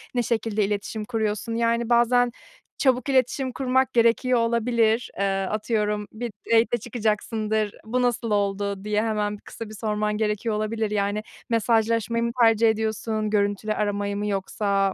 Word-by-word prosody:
ne 245 Hz, -, +2 dB
şekilde 220 Hz, -2 st, 0 dB
iletişim 210 Hz, +1 st, -3 dB
kuruyorsun? 220 Hz, -1 st, -2 dB
Yani, 235 Hz, 0 st, +1 dB
bazen 240 Hz, +1 st, +4 dB, 0.5 s
çabuk 255 Hz, -1 st, +2 dB
iletişim 260 Hz, 0 st, +1 dB
kurmak 260 Hz, 0 st, +1 dB
gerekiyor 235 Hz, +1 st, +3 dB
olabilir. 230 Hz, 0 st, +1 dB
Eee, 200 Hz, -, +2 dB, 0.2 s
atıyorum, 210 Hz, -1 st, -1 dB
bir 235 Hz, +1 st, -5 dB, 0.2 s
date'e 230 Hz, +1 st, +4 dB
çıkacaksındır, 215 Hz, -1 st, -1 dB
"Bu 250 Hz, +3 st, 0 dB
nasıl 240 Hz, -2 st, 0 dB
oldu?" 200 Hz, -1 st, -1 dB
diye 210 Hz, 0 st, +1 dB
hemen 210 Hz, -2 st, -1 dB
bir -, -, -23 dB
kısa 225 Hz, -2 st, -9 dB
bir 215 Hz, -, -9 dB
sorman 210 Hz, -1 st, -1 dB
gerekiyor 215 Hz, 0 st, -1 dB
olabilir. 215 Hz, 0 st, -1 dB
Yani, 205 Hz, +1 st, 0 dB, 0.3 s
mesajlaşmayı 230 Hz, 0 st, +1 dB
mı 235 Hz, -, 0 dB
tercih 225 Hz, 0 st, +5 dB
ediyorsun, 220 Hz, 0 st, -1 dB
görüntülü 205 Hz, +1 st, 0 dB
aramayı 205 Hz, -1 st, -1 dB
mı 210 Hz, -, -2 dB
yoksa 195 Hz, 0 st, 0 dB
220 Hz, 145 wpm, -24 LUFS, 210-235 Hz, 0.5 s, tercih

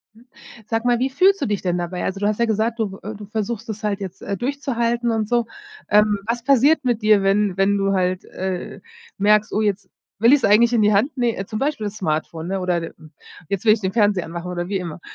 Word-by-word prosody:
Hm, 230 Hz, +2 st, -20 dB, 0.4 s
sag 225 Hz, +1 st, -2 dB
mal, 245 Hz, -1 st, +2 dB
wie 260 Hz, -, +1 dB
fühlst 385 Hz, +8 st, +3 dB
du -, -, 0 dB
dich 205 Hz, -2 st, -2 dB
denn 180 Hz, -1 st, -1 dB
dabei? 175 Hz, +1 st, -4 dB
Also, 195 Hz, +1 st, -3 dB
du 205 Hz, -, 0 dB
hast 210 Hz, 0 st, 0 dB
ja -, -, +4 dB
gesagt, 225 Hz, +2 st, 0 dB
du 200 Hz, -3 st, -3 dB
äh, 215 Hz, +2 st, -6 dB
du 205 Hz, 0 st, -10 dB
versuchst 220 Hz, +2 st, -4 dB
es 215 Hz, -1 st, -6 dB
halt, 205 Hz, -2 st, -1 dB
äh, 195 Hz, -, -3 dB
jetzt 190 Hz, 0 st, -9 dB, 0.2 s
durchzuhalten 240 Hz, -3 st, -1 dB
und 220 Hz, -2 st, -1 dB
so. 240 Hz, -1 st, +1 dB, 0.4 s
Ähm, 210 Hz, 0 st, +4 dB
was 235 Hz, +1 st, -2 dB
passiert 280 Hz, +3 st, +4 dB
mit 240 Hz, -3 st, 0 dB
dir, 215 Hz, -2 st, +4 dB
wenn 195 Hz, -1 st, +1 dB
wenn 200 Hz, +1 st, +2 dB
du 195 Hz, 0 st, +1 dB
halt, 185 Hz, -1 st, 0 dB
äh, 185 Hz, -1 st, -5 dB, 0.4 s
merkst: 210 Hz, +1 st, +3 dB
„Oh, 215 Hz, -, +1 dB
jetzt 200 Hz, -2 st, -1 dB, 0.3 s
will 235 Hz, +6 st, +6 dB
ich's 285 Hz, -, +1 dB
eigentlich 230 Hz, +3 st, +5 dB
in 225 Hz, -, +3 dB
die 210 Hz, 0 st, +4 dB
Hand“ 245 Hz, +10 st, +1 dB
ne 235 Hz, -6 st, -1 dB
zum 215 Hz, -, -5 dB
Beispiel 270 Hz, -6 st, -1 dB
Smartphone, 160 Hz, -3 st, -3 dB
ne, 195 Hz, 0 st, -2 dB
oder 180 Hz, -2 st, 0 dB
hm, 160 Hz, -1 st, -11 dB, 0.4 s
jetzt 200 Hz, +1 st, -3 dB
will 215 Hz, -, +6 dB
ich 220 Hz, -, +1 dB
den 190 Hz, -1 st, -2 dB
Fernseher 205 Hz, -5 st, +2 dB
anmachen 170 Hz, +2 st, -6 dB
oder 175 Hz, 0 st, -4 dB
wie 200 Hz, -, -2 dB
immer. 170 Hz, -3 st, -7 dB
210 Hz, 240 wpm, -21 LUFS, 190-235 Hz, 0.4 s, will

